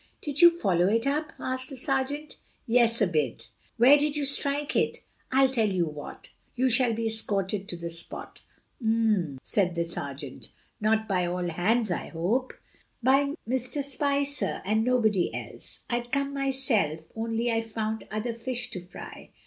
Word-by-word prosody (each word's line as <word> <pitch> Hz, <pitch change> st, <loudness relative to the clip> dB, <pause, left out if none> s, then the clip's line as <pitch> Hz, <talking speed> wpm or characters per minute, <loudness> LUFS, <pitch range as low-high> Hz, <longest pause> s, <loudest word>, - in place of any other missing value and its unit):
"Did 290 Hz, +1 st, -1 dB
you 345 Hz, -1 st, +8 dB
follow 180 Hz, -, +2 dB
it 225 Hz, +4 st, +2 dB
up?" 300 Hz, +3 st, -1 dB
asked 260 Hz, 0 st, -2 dB
the 270 Hz, -, -8 dB
sergeant. 270 Hz, +3 st, -1 dB, 0.3 s
"Yes, 230 Hz, -2 st, +3 dB
a -, -, +5 dB
bit." 135 Hz, -, -2 dB, 0.3 s
"Where 265 Hz, +5 st, +7 dB
did 295 Hz, 0 st, 0 dB
you 295 Hz, -1 st, 0 dB
strike 280 Hz, +1 st, +3 dB
it?" -, -, +1 dB, 0.3 s
"I'll 265 Hz, +1 st, +5 dB
tell 225 Hz, -5 st, +2 dB
you 180 Hz, -3 st, +1 dB
what: 150 Hz, -2 st, -9 dB, 0.2 s
you 255 Hz, +1 st, +2 dB
shall 245 Hz, 0 st, +4 dB
be 225 Hz, +1 st, -2 dB
escorted 205 Hz, -3 st, 0 dB
to 175 Hz, -, -3 dB
the 170 Hz, 0 st, -5 dB
spot." 165 Hz, 0 st, -5 dB, 0.4 s
"Um!" 215 Hz, -10 st, +1 dB
said 180 Hz, -4 st, 0 dB
the 170 Hz, 0 st, 0 dB
sergeant; 140 Hz, -4 st, -6 dB, 0.3 s
"not 220 Hz, +1 st, +1 dB
by 180 Hz, -3 st, +1 dB
all 180 Hz, 0 st, -2 dB
hands, 210 Hz, +6 st, +1 dB
I 175 Hz, -, -2 dB
hope?" 210 Hz, +11 st, -1 dB, 0.5 s
"By 280 Hz, +3 st, +3 dB
Mr. 255 Hz, +3 st, -1 dB
Spicer 280 Hz, 0 st, 0 dB
and 215 Hz, +3 st, +2 dB
nobody 220 Hz, -7 st, +2 dB
else. -, -, -7 dB
I'd 240 Hz, 0 st, -3 dB
come 280 Hz, 0 st, 0 dB
myself, 260 Hz, -, +1 dB
only 230 Hz, +1 st, -1 dB
I've 225 Hz, 0 st, -1 dB
found 220 Hz, 0 st, -3 dB
other 215 Hz, +2 st, -3 dB
fish 240 Hz, +1 st, -2 dB
to 180 Hz, -, -5 dB
fry. 180 Hz, -, -11 dB
230 Hz, 165 wpm, -27 LUFS, 190-265 Hz, 0.5 s, you